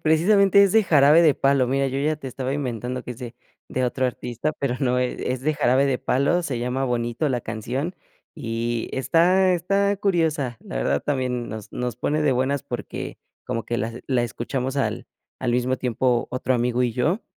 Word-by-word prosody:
precisamente 195 Hz, +5 st, +5 dB
es 200 Hz, -, +4 dB
de 220 Hz, +2 st, +4 dB
Jarabe 150 Hz, -1 st, +6 dB
de 155 Hz, -4 st, +5 dB
Palo, 135 Hz, -2 st, +2 dB
mira, 135 Hz, +2 st, +1 dB
yo 135 Hz, +1 st, -2 dB
ya 150 Hz, +3 st, +1 dB
te 140 Hz, -3 st, -8 dB
estaba 130 Hz, +1 st, -3 dB
inventando 125 Hz, -2 st, -3 dB
que -, -, -8 dB
es 120 Hz, -, -7 dB
de 120 Hz, -2 st, -7 dB, 0.3 s
de 130 Hz, -, -1 dB
otro 130 Hz, +1 st, 0 dB
artista, 125 Hz, +3 st, -3 dB
pero 130 Hz, -3 st, -1 dB
no, 125 Hz, -2 st, +2 dB
e 125 Hz, 0 st, -2 dB
es 130 Hz, -, -4 dB
de 155 Hz, +3 st, 0 dB
Jarabe 135 Hz, -1 st, +3 dB
de 130 Hz, -2 st, 0 dB
Palo, 140 Hz, +7 st, +1 dB
se 130 Hz, -6 st, -2 dB
llama 125 Hz, +2 st, -1 dB
Bonito 120 Hz, +3 st, -1 dB
la 125 Hz, -3 st, -1 dB
canción, 125 Hz, -, -4 dB, 0.4 s
y 115 Hz, 0 st, -3 dB
está 180 Hz, +7 st, +3 dB
está 200 Hz, +3 st, +1 dB
curiosa. 160 Hz, -, 0 dB
La 60 Hz, -, -8 dB
verdad -, -, 0 dB
también 125 Hz, -4 st, -1 dB
nos 110 Hz, -2 st, -8 dB
nos 125 Hz, -2 st, -3 dB
pone 150 Hz, +5 st, 0 dB
de 150 Hz, -, +3 dB
buenas, 130 Hz, +3 st, 0 dB
porque 125 Hz, -4 st, -6 dB, 0.3 s
como 115 Hz, -, -3 dB
que 120 Hz, -, -2 dB
las 115 Hz, -1 st, -3 dB
la 130 Hz, -3 st, +1 dB
escuchamos 125 Hz, +3 st, -3 dB
al 140 Hz, -, -1 dB, 0.3 s
al 125 Hz, -, 0 dB
mismo 125 Hz, +2 st, +1 dB
tiempo 125 Hz, -1 st, 0 dB
otro 130 Hz, +1 st, 0 dB
amigo 125 Hz, +1 st, +1 dB
y 120 Hz, -, -1 dB
yo, 155 Hz, -, 0 dB
130 Hz, 195 wpm, -23 LUFS, 120-150 Hz, 0.4 s, Jarabe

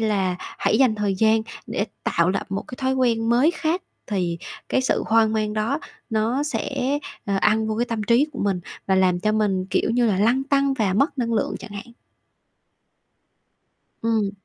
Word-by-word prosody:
là 195 Hz, -5 st, +1 dB
hãy -, -, -1 dB
dành 255 Hz, -5 st, +4 dB
thời 205 Hz, -2 st, 0 dB
gian 220 Hz, +2 st, +3 dB, 0.2 s
để -, -, -2 dB, 0.2 s
tạo 170 Hz, +2 st, +2 dB
lập -, -, -2 dB
một 195 Hz, -, -2 dB
cái -, -, -6 dB
thói 260 Hz, 0 st, 0 dB
quen 230 Hz, -3 st, +1 dB
mới 255 Hz, +7 st, +4 dB
khác 340 Hz, +1 st, -1 dB, 0.2 s
thì 175 Hz, -5 st, -1 dB, 0.3 s
cái 260 Hz, -, +2 dB
sự 260 Hz, -, +1 dB
hoang 220 Hz, -1 st, +4 dB
mang 215 Hz, -1 st, 0 dB
đó 225 Hz, +8 st, 0 dB, 0.3 s
nó 225 Hz, +5 st, +1 dB
sẽ, 275 Hz, -1 st, -1 dB, 0.3 s
ờ, 200 Hz, -, 0 dB
ăn 220 Hz, +1 st, +3 dB
vô 220 Hz, -, -1 dB
cái 240 Hz, -, +2 dB
tâm 230 Hz, -3 st, -2 dB
trí 235 Hz, +7 st, +3 dB
của 265 Hz, -, -8 dB
mình 195 Hz, -3 st, 0 dB, 0.3 s
và 190 Hz, -, +3 dB
làm 185 Hz, -2 st, +3 dB
cho 215 Hz, +2 st, +1 dB
mình, 200 Hz, -4 st, +1 dB
kiểu -, -, +1 dB
như 240 Hz, +1 st, +2 dB
là, 200 Hz, -4 st, +1 dB
lăn 245 Hz, +6 st, +2 dB
tăn 275 Hz, -1 st, +2 dB
và 210 Hz, -7 st, +1 dB
mất 280 Hz, -, +1 dB
năng 235 Hz, -2 st, 0 dB
lượng 215 Hz, -, 0 dB
chẳng -, -, -9 dB
hạn. 205 Hz, +4 st, -8 dB, 2.1 s
Ừm. 220 Hz, -3 st, +1 dB
220 Hz, 190 wpm, -23 LUFS, 200-255 Hz, 2.1 s, dành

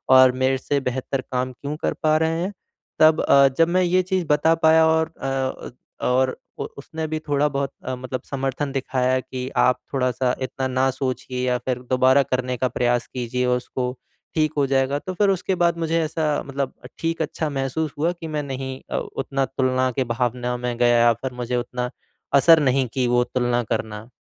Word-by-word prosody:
और 130 Hz, -1 st, +8 dB
मेरे 130 Hz, 0 st, +3 dB
से 140 Hz, +2 st, -1 dB
बेहतर 130 Hz, +1 st, -2 dB
काम 130 Hz, 0 st, -1 dB
क्यों 145 Hz, +4 st, -5 dB
कर -, -, -1 dB
पा 155 Hz, 0 st, +4 dB
रहे 160 Hz, +1 st, 0 dB
हैं? 195 Hz, -, -3 dB, 0.5 s
तब 155 Hz, 0 st, +6 dB
अ, 140 Hz, 0 st, +6 dB
जब 165 Hz, -, +5 dB
मैं 185 Hz, +1 st, +3 dB
ये 180 Hz, +1 st, +3 dB
चीज़ 185 Hz, -1 st, -1 dB
बता 150 Hz, +2 st, +4 dB
पाया 160 Hz, 0 st, +6 dB
और 160 Hz, 0 st, +1 dB
अ 135 Hz, -, -2 dB
अ, 135 Hz, -1 st, -3 dB, 0.4 s
और 130 Hz, +1 st, +3 dB, 0.3 s
अ, -, -, 0 dB
उसने 160 Hz, +3 st, -5 dB
भी 155 Hz, 0 st, -2 dB
थोड़ा 145 Hz, +1 st, +3 dB
बहुत 140 Hz, -1 st, -2 dB
अ, 130 Hz, -, -2 dB
मतलब 130 Hz, 0 st, -5 dB
समर्थन 135 Hz, +1 st, -2 dB
दिखाया 130 Hz, -1 st, 0 dB
कि 130 Hz, 0 st, -6 dB
आप 125 Hz, -, +4 dB
थोड़ा-सा 125 Hz, -1 st, +1 dB
इतना 130 Hz, 0 st, -2 dB
ना 130 Hz, +1 st, +1 dB
सोचिए 130 Hz, -1 st, -3 dB
या 125 Hz, 0 st, +2 dB
फिर 125 Hz, -1 st, -1 dB
दोबारा 130 Hz, +2 st, +5 dB
करने 125 Hz, -1 st, -2 dB
का 130 Hz, -, +1 dB
प्रयास 120 Hz, -1 st, 0 dB
कीजिए 125 Hz, 0 st, -2 dB
उसको, 125 Hz, 0 st, -1 dB, 0.4 s
ठीक 155 Hz, -1 st, +1 dB
हो 140 Hz, -, +3 dB
जाएगा। 135 Hz, +1 st, +1 dB
तो 185 Hz, -, -6 dB
फिर 200 Hz, +2 st, +2 dB
उसके 190 Hz, 0 st, 0 dB
बाद 170 Hz, 0 st, +2 dB
मुझे 165 Hz, 0 st, +1 dB
ऐसा 160 Hz, 0 st, -2 dB, 0.2 s
मतलब 140 Hz, -1 st, -3 dB, 0.3 s
ठीक 165 Hz, 0 st, -1 dB
अच्छा 155 Hz, 0 st, -2 dB
महसूस 135 Hz, +3 st, -2 dB
हुआ 165 Hz, +4 st, +1 dB
कि 170 Hz, -2 st, -8 dB
मैं 150 Hz, -2 st, -2 dB
नहीं 130 Hz, -1 st, -5 dB
अ, -, -, 0 dB
उतना 135 Hz, 0 st, -2 dB
तुलना 130 Hz, 0 st, 0 dB
की 130 Hz, +2 st, 0 dB
भावना 125 Hz, +1 st, -1 dB
में 125 Hz, 0 st, -3 dB
गया 120 Hz, 0 st, +4 dB
या 120 Hz, 0 st, +5 dB
फिर 130 Hz, +3 st, -6 dB
मुझे 125 Hz, +1 st, -2 dB
उतना 125 Hz, 0 st, -3 dB, 0.5 s
असर 160 Hz, +4 st, +7 dB
नहीं 130 Hz, -2 st, +2 dB
की 130 Hz, -2 st, +1 dB
वो 120 Hz, 0 st, +3 dB
तुलना 120 Hz, -1 st, 0 dB
करना। 110 Hz, 0 st, -4 dB
130 Hz, 195 wpm, -23 LUFS, 125-155 Hz, 0.5 s, और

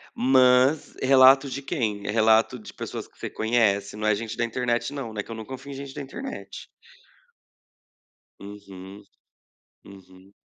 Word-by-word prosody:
Mas, 130 Hz, +3 st, +3 dB
relato 135 Hz, +1 st, +6 dB
de 140 Hz, -, -5 dB
quem? 110 Hz, -, -3 dB
É -, -, -1 dB
relato 110 Hz, +3 st, +3 dB
de 105 Hz, -, -12 dB
pessoas -, -, -7 dB
que -, -, -31 dB
você -, -, -5 dB
conhece? 105 Hz, -3 st, 0 dB
Não 110 Hz, 0 st, -3 dB
é 105 Hz, -, +3 dB
gente 110 Hz, +1 st, -6 dB
da 120 Hz, -, +1 dB
internet 120 Hz, +1 st, -2 dB
não, 130 Hz, -6 st, -6 dB
né? 105 Hz, -, -4 dB
Que 115 Hz, -, -12 dB
eu -, -, -5 dB
não 110 Hz, -1 st, -8 dB
confio 130 Hz, +1 st, -9 dB
em -, -, -7 dB
gente 135 Hz, 0 st, -8 dB
da 145 Hz, -, -6 dB
internet. 265 Hz, -, -8 dB, 1.7 s
Uhum. 100 Hz, -1 st, -11 dB, 0.8 s
Uhum. 95 Hz, 0 st, -16 dB
115 Hz, 160 wpm, -25 LUFS, 105-130 Hz, 1.7 s, relato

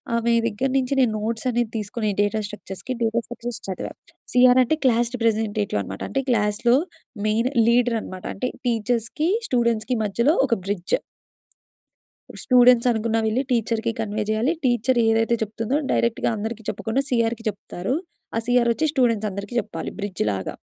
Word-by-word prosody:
ఆమె 235 Hz, 0 st, +1 dB
దగ్గర 235 Hz, +4 st, -1 dB
నుంచి 260 Hz, +1 st, 0 dB
నేను 245 Hz, -4 st, +4 dB
నోట్స్ 225 Hz, +2 st, -3 dB
అనేది 240 Hz, -2 st, 0 dB
తీసుకొని 215 Hz, +1 st, -3 dB
డేటా 205 Hz, +1 st, +1 dB
స్ట్రక్చర్స్‌కి, 210 Hz, +3 st, -6 dB
డేటా 225 Hz, +1 st, +1 dB
స్ట్రక్చర్స్ 240 Hz, -1 st, -6 dB
చదివా. 190 Hz, -, -4 dB, 0.4 s
సి 250 Hz, -, +2 dB
ఆర్ 255 Hz, -, +5 dB
అంటే 315 Hz, +6 st, +1 dB
క్లాస్ 240 Hz, -1 st, +3 dB
రిప్రజెంటేటివ్ 215 Hz, -, 0 dB
అన్నమాట. 95 Hz, 0 st, -7 dB
అంటే 270 Hz, -, 0 dB
క్లాస్‌లో 230 Hz, +2 st, +2 dB, 0.5 s
మెయిన్ 230 Hz, +4 st, +1 dB, 0.2 s
లీడర్ 240 Hz, -1 st, +3 dB
అన్నమాట. 185 Hz, -1 st, -9 dB
అంటే, 250 Hz, +6 st, -2 dB, 0.2 s
టీచర్స్‌కి, 235 Hz, +7 st, 0 dB, 0.2 s
స్టూడెంట్స్‌కి 235 Hz, -1 st, +1 dB
మధ్యలో 235 Hz, -, +2 dB
ఒక 230 Hz, -, +2 dB
బ్రిడ్జ్. 195 Hz, -3 st, 0 dB, 1.3 s
ఇప్పుడు -, -, -9 dB
స్టూడెంట్స్ 250 Hz, -1 st, +6 dB
అనుకున్నవి 225 Hz, -1 st, 0 dB
వెళ్లి 235 Hz, +5 st, +1 dB
టీచర్‌కి 230 Hz, -1 st, 0 dB
కన్వే 215 Hz, -1 st, -1 dB
చేయాలి. 220 Hz, +8 st, +1 dB
టీచర్ 245 Hz, 0 st, +2 dB
ఏదైతే 225 Hz, +1 st, +3 dB
చెప్తుందో 225 Hz, +6 st, -2 dB
డైరెక్ట్‌గా 235 Hz, -1 st, +1 dB
అందరికీ 220 Hz, +1 st, -5 dB
చెప్పకుండా 220 Hz, +6 st, -1 dB
సి 250 Hz, -, +1 dB
ఆర్‌కి 230 Hz, 0 st, -8 dB
చెప్తారు. 200 Hz, +3 st, -4 dB, 0.4 s
ఆ -, -, +3 dB
సి 245 Hz, -, +1 dB
ఆర్ 235 Hz, -, +2 dB
వచ్చి 315 Hz, +6 st, 0 dB
స్టూడెంట్స్ 230 Hz, -6 st, +2 dB
అందరికి 200 Hz, +4 st, -6 dB
చెప్పాలి 165 Hz, -4 st, -6 dB
బ్రిడ్జ్ 200 Hz, -2 st, -2 dB
లాగా. 95 Hz, -1 st, -4 dB
230 Hz, 155 wpm, -23 LUFS, 215-245 Hz, 1.3 s, స్టూడెంట్స్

